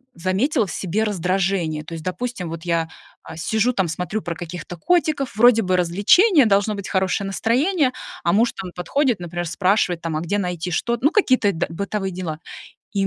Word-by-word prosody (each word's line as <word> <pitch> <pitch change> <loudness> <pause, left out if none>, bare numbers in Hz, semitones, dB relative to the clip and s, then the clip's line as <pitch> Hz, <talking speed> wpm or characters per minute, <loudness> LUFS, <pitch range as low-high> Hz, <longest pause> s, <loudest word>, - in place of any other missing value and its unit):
заметила 205 - +1
в - - -6
себе 195 +4 -1
раздражение. 185 -5 -1
То 165 - -9
есть, 160 -1 -6
допустим, 185 0 -4
вот 165 0 -7
я, 165 -2 0 0.3
а, 160 - -10
сижу, 220 +8 +1
там 190 -5 0
смотрю 180 +6 -3
про 170 -2 -4
каких-то 175 +1 -7
котиков. 305 - 0
Вроде 230 0 +6
бы 185 -1 +1
развлечение, 220 - +4
должно 205 0 +2
быть 200 -1 -6
хорошее 190 +1 0
настроение, 260 - +1 0.3
а 170 - +2
муж 230 +3 +3
там 180 -2 -7
подходит, 240 - 0
например, 175 0 -4
спрашивает, 180 -1 +1
там: 165 -2 -2
"А 155 - -2
где 200 +5 -1
найти 180 -2 -3
"что"" 235 +8 0
ну, 290 +6 +3
какие-то 255 - +3
д 165 - -1
бытовые 195 +2 -3
дела. 175 -4 -5 0.5
И 195 -2 +1
190 Hz, 185 wpm, -21 LUFS, 175-225 Hz, 0.5 s, Вроде